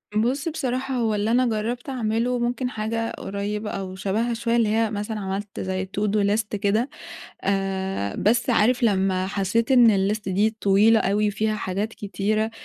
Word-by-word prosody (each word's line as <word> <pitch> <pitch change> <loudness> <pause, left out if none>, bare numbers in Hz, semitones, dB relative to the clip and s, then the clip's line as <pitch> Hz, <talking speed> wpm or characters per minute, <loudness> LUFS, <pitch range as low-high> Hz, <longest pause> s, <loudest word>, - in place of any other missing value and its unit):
بُص، 250 +8 +1
بصراحة 265 -4 -2
هو 225 -3 +1
اللي 210 +2 0
أنا 250 +2 +3
جرّبت 235 +3 -2
أعمله 240 0 0
ممكن 245 +1 -1
حاجة 225 0 -2
قريّبة 205 +2 -4
أو 190 -2 -5
شبهها 215 +5 -1
شوية 230 0 0
اللي 230 -3 +3
هي 220 0 +1
مثلًا 210 +1 -3
عملت 195 +1 -4
زي 190 0 -2
to 195 +2 -5
do 205 -1 +2
list 210 +1 +1
كده. 210 +6 +1 0.6
آآ 190 - -1
بس 235 +4 +2
عارف 240 +2 +3
لمّا 190 -4 +2
حسّيت 205 +5 0
إن 220 -6 +5
الlist 215 - -3
دي 210 +4 +1
طويلة 210 +3 +5
أوي 210 +2 +1
وفيها 215 +1 -1
حاجات 200 +1 -2
كتيرة، 215 +2 -1
215 Hz, 165 wpm, -24 LUFS, 195-230 Hz, 0.6 s, إن